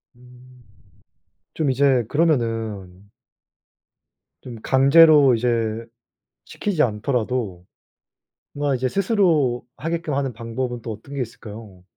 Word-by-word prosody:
음. 125 0 -19 0.9
좀 150 -4 0
이제 130 -2 +2
그러면은 115 - -1 1.3
좀 120 -3 -9
강제로 140 0 +6
이제 115 -1 -1 0.6
시키지 185 -7 -1
않더라도 110 -4 -2 0.9
뭔가 145 -1 -1
이제 130 +1 -1
스스로 170 - +1
하게끔 165 -1 -3
하는 135 -2 -1
방법은 120 +1 -5
또 115 - -6
어떤 140 +6 -11
게 135 - -2
있을까요? 105 -5 -9
125 Hz, 220 characters per minute, -22 LUFS, 115-140 Hz, 1.3 s, 강제로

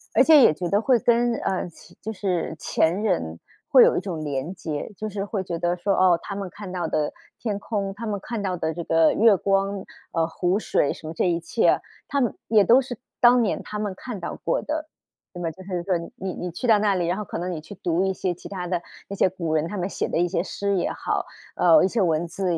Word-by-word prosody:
而 - - +7
且 320 - +7
也 - - +7
觉 175 +3 -4
得 200 +4 +2
会 250 +1 +4
跟 235 +1 +3
呃， 190 -4 -2
起 170 - -17
就 220 - -4
是 185 -6 -2
前 170 +5 +1
人 85 - -1 0.3
会 - - +8
有 - - +4
一 - - +3
种 175 -5 -4
连 140 +4 -3
接。 155 0 -5
就 215 - -4
是 200 -1 -4
会 200 -1 -3
觉 175 -2 -4
得 175 +1 0
说， 195 +3 0
哦， 180 -2 +4
他 200 - -5
们 195 -2 -4
看 205 0 -9
到 175 -2 -2
的 150 -1 -1 0.3
天 215 -4 -2
空， 200 -2 -3
他 220 +4 -7
们 205 -2 -2
看 230 -1 -4
到 185 -2 -2
的 160 -1 -2
这 170 +1 -5
个 165 -1 +4
月 220 -1 +5
光， 195 +1 0 0.3
呃， 165 -1 +1
湖 180 +4 0
水 145 - +1
什 155 - -8
么 160 - -5
这 180 - +1
一 170 -1 +1
切， 170 +7 +2 0.3
他 280 - 0
们 245 -5 0
也 215 -2 +5
都 240 +7 +6
是 250 -2 -7 0.2
当 245 0 +7
年 220 - 0
他 210 - -6
们 205 -2 -2
看 235 0 -7
到 - - -5
过 - - +1
的。 310 +1 -4 0.4
那 175 - -7
么 165 - -1
就 185 - -14
是 180 -3 -3
说 185 0 +1 0.2
你 190 0 -4
你 180 - -5
去 175 +8 -6
到 220 -3 +5
那 205 -2 +2
里， 175 -2 0
然 175 +2 0
后 210 - -4
可 - - -6
能 180 +1 -3
你 160 -3 -5
去 180 +6 -11
读 175 0 0
一 190 - +1
些 185 -1 -2
其 175 - -11
他 185 -3 -4
的 180 -1 -1 0.3
那 200 - -6
些 190 - +3
古 170 -3 -3
人， 160 +1 +1
他 205 - -5
们 180 -1 -1
写 - - -2
的 - - -1
一 175 +1 +2
些 175 -1 0
诗 200 +1 -2
也 175 - 0
好 - - -2 0.3
呃， 170 -2 +6
一 - - +3
些 225 +2 0
文 165 -2 +1
字 175 0 -1
190 Hz, 275 characters per minute, -24 LUFS, 170-210 Hz, 0.4 s, 会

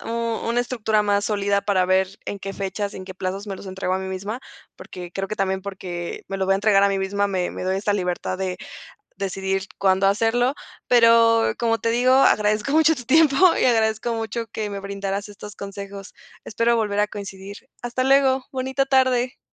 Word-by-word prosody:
una 230 +1 -1
estructura 220 -3 0
más 205 0 +1
sólida 200 -1 +1
para 190 -3 +2
ver 190 0 +2 0.2
en 200 - -5
qué 195 0 -6
fechas, 200 +1 -4
en 185 - -7
qué 190 0 -9
plazos 190 +2 -4
me 195 -2 -5
los 195 - -11
entrego 185 -1 -3
a - - 0
mí 190 0 -5
misma, 200 +6 -5 0.4
porque 180 -1 -9
creo 195 +1 -3
que 215 - -4
también 190 0 -1
porque 180 -3 -6
me 195 - -3
lo 190 0 -1
voy 195 - +3
a - - +3
entregar 200 0 +3
a 200 - +5
mí 195 0 0
misma, 200 +1 0
me 185 -3 -1
me - - -7
doy 190 +1 0
esa 205 +1 0
libertad 185 -1 -2
de, 185 -1 -2 0.6
decidir 195 0 -2
cuándo 190 0 +3
hacerlo. 225 +6 +2 0.3
Pero, 230 -1 +5
como 230 -1 +1
te 230 - -1
digo, 245 +2 +3
agradezco 215 -1 +3
mucho 320 +1 +5
tu 250 -4 -9
tiempo, 285 +2 +4 0.2
y - - +2
agradezco 225 -1 +1
mucho 225 +1 -3
que 215 -2 -4
me 200 -1 -5
brindaras 200 +1 -4
estos 205 +1 -11
consejos. 200 0 -8 0.3
Espero 230 +2 +1
volver 205 -2 0
a 210 - +3
coincidir. 200 -1 -8 0.3
Hasta 245 +1 -2
luego. 265 -1 +3
Bonita 265 +1 -1
tarde. 260 -1 +2
205 Hz, 195 wpm, -22 LUFS, 195-230 Hz, 0.6 s, a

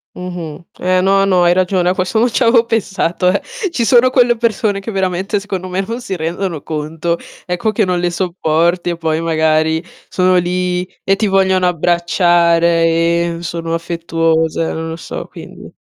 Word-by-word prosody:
Mh-mh. 175 -3 -7 0.2
Eh, 185 0 +2
no, 195 +1 +3
no, 185 -2 +3
hai 175 - +4
ragione, 185 -1 +1
a 180 - +2
questo 185 +4 -1
non 240 +3 +3
ci 245 - 0
avevo 230 0 +4
pensato, 195 -5 0
eh. 195 - 0 0.3
Ci 245 -8 -1
sono 245 +3 +5
quelle 245 -2 +3
persone 215 -3 0
che 200 - -6
veramente, 190 +1 -1
secondo 190 -2 -5
me, 185 +2 -2
non 230 +3 -4
si 195 -6 -4
rendono 165 -1 -3
conto, 160 +2 -3 0.3
ecco, 180 +5 -1
che 215 0 +1
non 180 -1 -1
le 175 0 0
sopporti, 170 -1 0
e 170 - -3
poi 160 -1 -1
magari 160 0 +1 0.2
sono 185 0 +2
lì, 180 0 0 0.2
e 195 - +3
ti 210 +1 0
vogliono 190 -1 +2
abbracciare, 170 0 +2
e 170 +1 +1
sono 170 -1 -4
affettuose, 165 -1 -1
non 160 0 -4
lo 160 - -5
so, 165 - -7
quindi - - -12
180 Hz, 175 wpm, -16 LUFS, 165-195 Hz, 0.3 s, sono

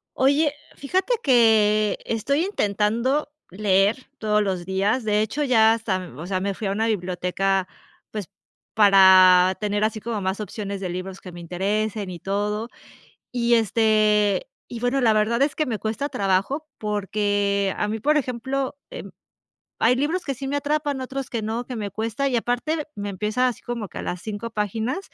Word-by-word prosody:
Oye, 285 +3 +3 0.2
fíjate 370 - -1
que 215 -4 +4
estoy 280 - 0
intentando 235 - 0 0.2
leer 195 +3 +2 0.2
todos 210 -1 +2
los 190 -3 -2
días. 195 +7 0
De 210 -1 +1
hecho, 220 +7 -2
ya 225 -5 +5
hasta, 225 -4 -1
m 180 -7 -7
o 170 - -6
sea, 185 -1 -1
me 200 +1 -2
fui 205 +1 -4
a - - -1
una 215 +3 0
biblioteca, 190 -1 -1 0.4
pues, 210 -4 -5 0.5
para 190 -3 +7
tener 210 0 -1
así 215 0 0
como 220 -2 -3
más 190 +2 -2
opciones 200 -1 -5
de 185 - -3
libros 185 +2 -6
que 185 - -10
me 175 - -10
interesen 200 +3 -2
y 175 - -8
todo, 210 +4 -2 0.6
y, 240 -1 +1
este, 215 -3 +3 0.2
y 235 -2 -7
bueno, 245 +3 +1
la 230 -4 +4
verdad 220 +4 +1
es 285 +1 +2
que 310 - 0
me 230 -6 -3
cuesta 225 +7 -3
trabajo, 200 +11 0
porque 205 -1 0
a 210 - 0
mí, 215 +1 -3
por 300 +5 +3
ejemplo, 265 +1 -2
em, - - -8 0.7
hay 235 +3 +4
libros 310 +7 -1
que 275 - -1
sí 270 +2 -6
me 285 - 0
atrapan, 290 -1 -1
otros 265 0 -5
que 230 - -3
no, 225 +3 -3
que 250 -1 -6
me 205 -2 -4
cuesta, 225 +6 -2
y 260 - 0
aparte 245 +7 -1
me 205 0 -5
empieza 215 +6 0
así 245 - -4
como 235 -4 -5
que - - -9
a - - -3
las 175 0 -4
5 215 +2 -5
páginas, 220 - -2
215 Hz, 180 wpm, -23 LUFS, 200-250 Hz, 0.7 s, para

